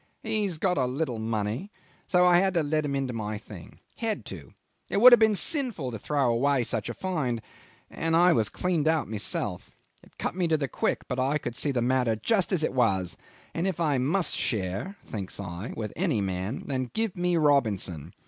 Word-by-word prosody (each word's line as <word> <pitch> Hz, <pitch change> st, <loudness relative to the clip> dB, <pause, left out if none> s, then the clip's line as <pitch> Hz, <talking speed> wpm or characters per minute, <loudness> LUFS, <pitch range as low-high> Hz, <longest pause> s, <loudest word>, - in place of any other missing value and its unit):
"He's 205 Hz, -6 st, 0 dB
got 180 Hz, -1 st, +1 dB
a 130 Hz, -, +2 dB
little 130 Hz, -3 st, -2 dB
money, 110 Hz, -, -2 dB, 0.4 s
so 180 Hz, -1 st, +4 dB
I 175 Hz, -1 st, +6 dB
had 190 Hz, 0 st, +1 dB
to 165 Hz, -, +3 dB
let 155 Hz, +1 st, 0 dB
him 140 Hz, -1 st, -2 dB
into 135 Hz, -2 st, -2 dB
my 110 Hz, -2 st, -3 dB
thing. -, -, -12 dB, 0.2 s
Had 225 Hz, -3 st, -2 dB
to! -, -, -9 dB, 0.4 s
It -, -, +1 dB
would 250 Hz, +4 st, +10 dB
have 240 Hz, -, +8 dB
been 220 Hz, -1 st, +4 dB
sinful 240 Hz, -, 0 dB
to 115 Hz, -, -6 dB
throw 140 Hz, +3 st, 0 dB
away 135 Hz, +2 st, +2 dB
such 115 Hz, -1 st, -1 dB
a 120 Hz, -, -5 dB
find, 150 Hz, -11 st, -2 dB, 0.5 s
and 165 Hz, 0 st, -1 dB
I 175 Hz, +1 st, +6 dB
was 110 Hz, -3 st, +2 dB
cleaned 175 Hz, -5 st, -1 dB
out 160 Hz, -1 st, +2 dB
myself. 105 Hz, -2 st, -2 dB, 0.3 s
It -, -, -22 dB
cut -, -, -3 dB
me 180 Hz, -2 st, 0 dB
to 160 Hz, -1 st, +2 dB
the 140 Hz, -2 st, -2 dB
quick, -, -, -2 dB
but 125 Hz, -, -3 dB
I 135 Hz, +4 st, +1 dB
could 120 Hz, -5 st, -6 dB
see 145 Hz, -, +1 dB
the 120 Hz, -3 st, 0 dB
matter 125 Hz, -2 st, +2 dB
just 195 Hz, -, +1 dB
as 175 Hz, -5 st, +1 dB
it -, -, 0 dB
was, 95 Hz, -8 st, +1 dB, 0.4 s
and 170 Hz, +3 st, -1 dB
if 185 Hz, -3 st, -2 dB
I 150 Hz, -5 st, +1 dB
must 160 Hz, +6 st, +1 dB
share 100 Hz, -, -2 dB
thinks 100 Hz, -3 st, -5 dB
I 95 Hz, +2 st, -6 dB
with 105 Hz, -2 st, -4 dB
any 165 Hz, -, 0 dB
man, 95 Hz, +4 st, -3 dB
then 130 Hz, -3 st, -2 dB
give 225 Hz, -3 st, 0 dB
me 180 Hz, -1 st, +1 dB
Robinson. 100 Hz, -, +1 dB
140 Hz, 205 wpm, -27 LUFS, 115-180 Hz, 0.5 s, would